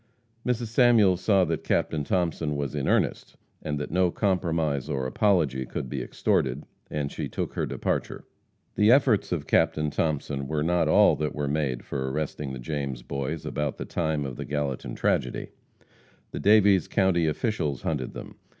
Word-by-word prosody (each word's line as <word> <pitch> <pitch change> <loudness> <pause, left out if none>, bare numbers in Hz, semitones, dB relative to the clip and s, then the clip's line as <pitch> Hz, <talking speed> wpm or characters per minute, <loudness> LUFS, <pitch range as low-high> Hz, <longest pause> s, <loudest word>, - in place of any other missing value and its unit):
Mrs. 120 -2 -1
Samuels 110 -6 +4
saw 95 -2 +4
that - - -2
Captain 75 -2 0
Thomason 80 -3 -1
was 70 0 -3
in 70 -2 -2
earnest, - - 0 0.3
and 75 -1 -3
that 75 - -5
no 90 +1 +3
compromise 85 - 0
or 65 -2 -1
apology 75 -4 +1
could 65 0 -5
be - - -3
extorted, 65 +2 0 0.3
and 75 -2 -3
she - - -4
took - - -4
her - - -2
departure. - - -3 0.5
The 105 +1 +3
efforts 125 -6 +3
of 80 -5 -2
Captain 75 +1 +2
Thomason 70 -3 -2
were 75 0 -1
not 85 0 +2
all - - +5
that 75 0 -2
were 75 -1 -2
made 70 -4 -1
for 65 -1 -3
arresting 75 -1 -3
the 65 - -5
James 65 -1 -4
boys 70 +4 -4
about 75 -1 -2
the - - -5
time 80 -4 -1
of 65 -3 -6
the - - -5
Gallatin 70 -3 -3
tragedy. - - -1 0.8
The - - -5
Daviess 100 -3 +5
county 95 -4 +2
officials 80 - -1
hunted 70 -6 -2
them. - - -9
75 Hz, 170 wpm, -26 LUFS, 70-90 Hz, 0.8 s, all